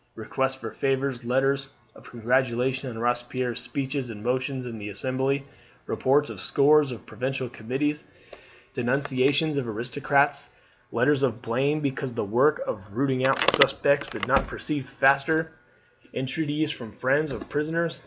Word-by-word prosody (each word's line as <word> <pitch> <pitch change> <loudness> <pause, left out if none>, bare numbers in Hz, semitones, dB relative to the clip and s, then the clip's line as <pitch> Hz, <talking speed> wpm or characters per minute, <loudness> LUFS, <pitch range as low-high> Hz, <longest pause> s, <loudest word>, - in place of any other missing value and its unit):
Requests 135 +4 -1
for 115 -4 -7
favours, 135 -2 -1
letters 135 +2 +1 0.2
of - - -15
congratulation 125 +2 0
on 115 - -7
Robespierre's 120 +1 -1
speeches 135 +1 -3
and 105 -2 -8
motions 130 +1 -1
in 115 -2 -6
the 105 0 -6
Assembly, 130 +6 -1 0.4
reports 145 +3 +1
of - - -9
scores 145 0 +4
of 120 - -8
provincial 130 0 -3
committees, 135 +6 -2 0.7
denunciations 140 +4 +1
of 135 -4 -1
aristocrats, 130 +6 0 0.4
letters 145 -2 +2
of 125 -3 0
blame 135 +6 0
because 135 -2 -2
the - - -1
work 125 +9 +3
of 105 - -4
rooting 130 0 +2
out 135 - +3
the - - +5
suspects - - +4
did - - -4
not - - +3
proceed 145 -4 -4
faster, 140 +4 +2 0.6
entreaties 150 +3 -1
from 115 -6 -8
friends 140 +8 +1
of - - -7
prisoners. 165 +3 -1
135 Hz, 145 wpm, -26 LUFS, 125-140 Hz, 0.7 s, the